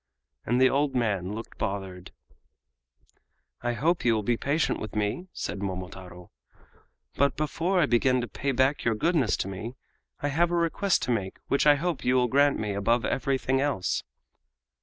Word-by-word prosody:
and 120 +2 +2
the 130 - +6
old 140 +1 +1
man 105 -5 0
looked 115 - -9
bothered. 95 -3 -4 1.5
"I 120 0 -1
hope 160 +9 +1
you 115 -2 +3
will 110 - -1
be 120 +3 +1
patient 145 +7 0
with 110 - -7
me," 105 - -1
said 100 - -5
Momotaro; 90 -2 -7 0.8
"but 140 +1 +2
before 165 +5 0
I 170 - +5
begin 125 0 +2
to 120 - -4
pay 135 +5 -2
back 130 +3 +1
your 115 -2 +1
goodness 150 -2 +1
to - - -2
me 105 +6 -6 0.4
I 145 - -1
have 165 +4 +2
a 175 - 0
request 170 +3 +1
to 125 - -1
make 100 -5 -2
which 140 +2 +2
I 145 - +8
hope 165 0 -2
you 125 - +2
will 125 -1 +3
grant 140 +3 +4
me 105 -1 -2
above 115 +4 +1
everything 135 0 0
else." 140 -10 0
125 Hz, 175 wpm, -27 LUFS, 105-145 Hz, 1.5 s, I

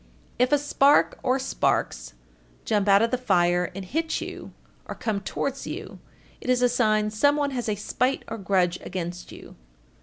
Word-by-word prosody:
If 250 +1 +3
a 295 - +5
spark 285 0 +3
or 260 0 +1
sparks - - -1 0.5
jump 205 -2 +1
out 200 +2 +6
of 230 - +1
the 255 - 0
fire 175 -6 +2
and 195 -1 -6
hit 320 - -2
you - - -8 0.4
or - - -6
come 210 -3 -2
towards 275 +6 -4
you, - - -7 0.4
it - - -7
is 250 0 +3
a 245 - +5
sign 215 -3 +1
some 285 +7 +3
one 290 -1 0
has 245 -4 -3
a 210 - 0
spite 250 +6 -1
or 225 0 -6
grudge 185 -3 +1
against 180 -1 -6
you. - - -12
220 Hz, 180 wpm, -25 LUFS, 190-260 Hz, 0.5 s, out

